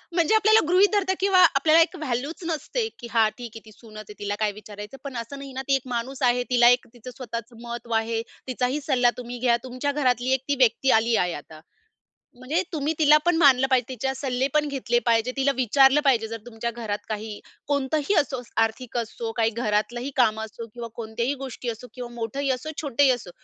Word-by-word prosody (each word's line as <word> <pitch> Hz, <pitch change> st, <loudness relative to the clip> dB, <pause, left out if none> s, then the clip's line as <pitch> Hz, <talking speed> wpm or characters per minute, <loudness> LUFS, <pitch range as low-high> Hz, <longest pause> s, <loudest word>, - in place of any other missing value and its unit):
म्हणजे 340 Hz, +5 st, +3 dB
आपल्याला 435 Hz, +1 st, +5 dB
गृहीत 380 Hz, +3 st, +5 dB
धरता 380 Hz, -2 st, +2 dB
किंवा 385 Hz, -1 st, +3 dB
आपल्याला 310 Hz, +4 st, +5 dB
एक -, -, +1 dB
व्हॅल्यूच 275 Hz, +7 st, -3 dB
नसते, 440 Hz, +8 st, -2 dB
की 240 Hz, -, -8 dB
हा 225 Hz, -2 st, +4 dB
ठीक 240 Hz, -2 st, -8 dB
आहे 220 Hz, -, -11 dB
ती 215 Hz, -, -14 dB
सूनच 215 Hz, 0 st, -15 dB
आहे 210 Hz, -, -12 dB
तिला 205 Hz, 0 st, -2 dB
काय 215 Hz, -1 st, +1 dB
विचारायचं 210 Hz, +3 st, -10 dB
पण 270 Hz, -4 st, -6 dB
असं 235 Hz, +5 st, -6 dB
नाही 275 Hz, -1 st, -8 dB
ना 265 Hz, -, -4 dB
ती 275 Hz, -, +4 dB
एक 265 Hz, -1 st, -3 dB
माणूस 260 Hz, +3 st, -4 dB
आहे, 245 Hz, 0 st, -1 dB
तिला 240 Hz, -1 st, +6 dB
एक 245 Hz, 0 st, +2 dB
तिचं 245 Hz, +1 st, -10 dB
स्वतःचं 235 Hz, -1 st, -7 dB
महत्व 235 Hz, 0 st, -6 dB
आहे, 225 Hz, 0 st, -2 dB, 0.3 s
तिचाही 255 Hz, +3 st, -1 dB
सल्ला 250 Hz, -4 st, +2 dB
तुम्ही 245 Hz, 0 st, -7 dB
घ्या. 240 Hz, -1 st, +3 dB
तुमच्या 255 Hz, +3 st, -3 dB
घरातली 255 Hz, -3 st, 0 dB
एक 265 Hz, -, +1 dB
ती 285 Hz, -, +2 dB
व्यक्ती 235 Hz, +4 st, +1 dB
आली 230 Hz, 0 st, +1 dB
आहे 180 Hz, -3 st, +1 dB
आता. 155 Hz, 0 st, -14 dB, 0.8 s
म्हणजे 290 Hz, +8 st, -1 dB
तुम्ही 305 Hz, +1 st, -1 dB
तिला 300 Hz, 0 st, +7 dB
पण 350 Hz, -1 st, +3 dB
मानलं 265 Hz, -4 st, +5 dB
पाहिजे, 255 Hz, -3 st, +2 dB
तिच्या 265 Hz, +2 st, -2 dB
सल्ले 260 Hz, -1 st, -1 dB
पण 300 Hz, -1 st, +2 dB
घेतले 255 Hz, -4 st, -1 dB
पाहिजे. 230 Hz, +1 st, +2 dB
तिला 275 Hz, +1 st, +2 dB
विचारलं 270 Hz, +3 st, +4 dB
पाहिजे 230 Hz, -5 st, +3 dB
जर 230 Hz, +1 st, -5 dB
तुमच्या 235 Hz, 0 st, -4 dB
घरात 215 Hz, -3 st, -5 dB
काही 215 Hz, 0 st, -5 dB, 0.3 s
कोणतंही 285 Hz, +5 st, 0 dB
असो 275 Hz, -4 st, -2 dB, 0.2 s
आर्थिक 240 Hz, +2 st, -4 dB
असो 230 Hz, 0 st, -4 dB
काही 225 Hz, -1 st, +3 dB
घरातलंही 235 Hz, +3 st, -2 dB
काम 220 Hz, -4 st, +3 dB
असो 220 Hz, +1 st, -7 dB
किंवा 240 Hz, -1 st, -6 dB
कोणत्याही 235 Hz, +4 st, -2 dB
गोष्टी 250 Hz, -2 st, -5 dB
असो 230 Hz, +2 st, -7 dB
किंवा 250 Hz, -2 st, -7 dB
मोठंही 270 Hz, +5 st, -3 dB
असो 260 Hz, +5 st, -4 dB
किंवा 315 Hz, -, -6 dB
छोटंही 275 Hz, +1 st, +3 dB
असो. 240 Hz, -7 st, -3 dB
250 Hz, 205 wpm, -24 LUFS, 230-280 Hz, 0.8 s, तिला